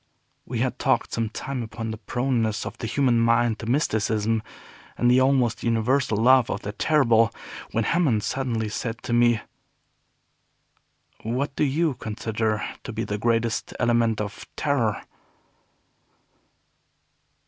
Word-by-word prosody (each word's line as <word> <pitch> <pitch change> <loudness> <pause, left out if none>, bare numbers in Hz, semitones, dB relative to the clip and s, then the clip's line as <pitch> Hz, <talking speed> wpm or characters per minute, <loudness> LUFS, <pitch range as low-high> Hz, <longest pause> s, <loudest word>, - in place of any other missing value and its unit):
We - - -2
had - - -1
talked - - +1
some 115 -1 -1
time 135 +3 -4
upon 115 0 -5
the 110 - -6
proneness 115 -1 -1
of - - -6
the 115 - -3
human 125 -1 +2
mind 115 -1 +2
to 110 - -6
mysticism, 110 -4 +1 0.6
and 120 0 +3
the 130 +1 +5
almost 130 -3 +2
universal 115 +1 +1
love 125 +2 +5
of 100 - -3
the 105 - -4
terrible, 115 -3 +3 0.4
when 115 - 0
Hammond 135 -9 +1
suddenly 120 -5 -1
said 115 +2 -4
to 120 - -3
me. 120 -2 +4 1.8
"What 130 +5 -2
do - - +1
you 150 +2 +1
consider 110 -1 -2 0.2
to - - -6
be 110 +1 -3
the 105 -1 -3
greatest 115 0 0
element 115 -2 +2
of 105 -1 -5
terror?" 125 -8 0
115 Hz, 135 wpm, -24 LUFS, 110-130 Hz, 1.8 s, the